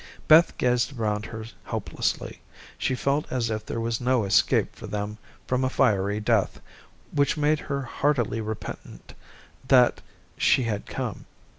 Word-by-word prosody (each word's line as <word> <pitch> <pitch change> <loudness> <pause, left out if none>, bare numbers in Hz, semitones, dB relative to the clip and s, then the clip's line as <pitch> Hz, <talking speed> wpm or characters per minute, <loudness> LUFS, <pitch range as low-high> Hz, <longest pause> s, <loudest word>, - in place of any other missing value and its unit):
Beth 160 +2 +6
gazed 125 +2 +1
around 105 -1 -1
her 110 -1 -7 0.2
helplessly. - - -3 0.3
She 130 - -1
felt 140 +3 -1
as 120 -3 -1
if 110 -1 -3
there 115 - -4
was 115 0 -2
no 125 -2 +2
escape 100 - +2
for - - -9
them 105 +1 -4 0.3
from 125 0 0
a 130 - +2
fiery 100 -3 +2
death, 110 -2 +1 0.5
which 145 +1 +2
made 150 0 +2
her 140 -1 -3
heartily 125 -4 0
repentant 110 0 -7 0.5
that 125 -2 +5 0.4
she 130 - +4
had 105 -3 -3
come. - - -5
120 Hz, 145 wpm, -26 LUFS, 110-135 Hz, 0.5 s, Beth